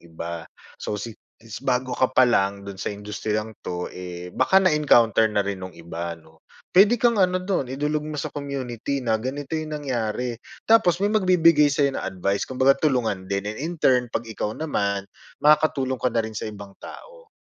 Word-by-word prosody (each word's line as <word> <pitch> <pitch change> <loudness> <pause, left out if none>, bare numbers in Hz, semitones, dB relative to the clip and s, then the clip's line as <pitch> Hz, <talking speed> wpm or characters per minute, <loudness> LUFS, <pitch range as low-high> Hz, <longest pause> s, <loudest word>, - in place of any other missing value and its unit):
iba. 85 0 -5 0.4
So, - - -3
si 115 +1 -6 0.2
since 115 -2 -10
bago 130 -1 0
ka 130 +1 +2
pa 130 - +8
lang 100 -4 +1
do'n 100 -1 -8
sa - - -2
industriyang 105 +1 -4
'to, 90 0 -4
eh, 90 -1 -8
baka 190 - +2
na-encounter 130 - +4
na 105 -1 +1
rin 100 -1 -4
no'ng 95 -2 -8
iba, 85 0 -6
'no? 80 0 -21 0.3
Puwede 205 +6 +6
kang 235 -2 +3
ano 185 -1 +3
do'n, 180 -9 -2
idulog 150 +1 -1
mo 155 - -5
sa - - -5
community 140 -2 -3
na 115 -2 +2
ganito 135 +5 -5
'yong 155 -1 -3
nangyari. 125 -2 -2 0.3
Tapos 220 -6 +5
may 205 +2 +1
magbibigay 170 -7 +5
sa'yo 140 -1 +2
ng - - -3
advice, 100 +2 -2
kumbaga, 130 +1 +4
tulungan 115 -10 0
din. 100 0 -1
And 105 +1 -4
in 165 +3 -3
turn, 125 -4 +3
'pag 115 - -2
ikaw 110 -1 -3
naman, 100 -10 -1 0.3
makakatulong 140 -4 +2
ka - - +3
na 115 -1 0
rin 110 0 -7
sa 110 - -4
ibang 100 -1 -10
tao. - - -12
125 Hz, 185 wpm, -24 LUFS, 100-150 Hz, 0.4 s, pa